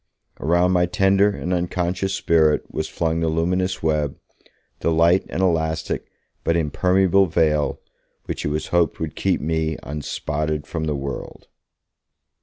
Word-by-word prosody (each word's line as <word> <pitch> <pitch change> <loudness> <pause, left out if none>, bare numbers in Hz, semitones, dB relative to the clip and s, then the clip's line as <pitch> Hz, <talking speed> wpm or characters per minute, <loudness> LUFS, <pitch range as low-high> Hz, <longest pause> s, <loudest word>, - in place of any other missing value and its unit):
Around 85 +4 +2
my 90 -1 +3
tender 100 +1 +3
and 90 -3 -3
unconscious 90 +2 -1
spirit 80 -3 +3
was - - -2
flung 80 -1 -1
the 80 - 0
luminous 90 +3 0
web, 75 -3 0 0.6
the - - 0
light 85 +3 +3
and 95 - -1
elastic 80 -3 0 0.4
but 85 - +2
impermeable 95 +4 +3
veil, 75 -2 +1 0.5
which - - -4
it - - -1
was 75 +1 -3
hoped 85 -2 +1
would 80 -2 -4
keep - - 0
me 80 0 -1
'unspotted 75 +1 -3
from 80 -1 -3
the 75 -2 -1
world'. 70 0 -6
80 Hz, 140 wpm, -22 LUFS, 75-90 Hz, 0.6 s, my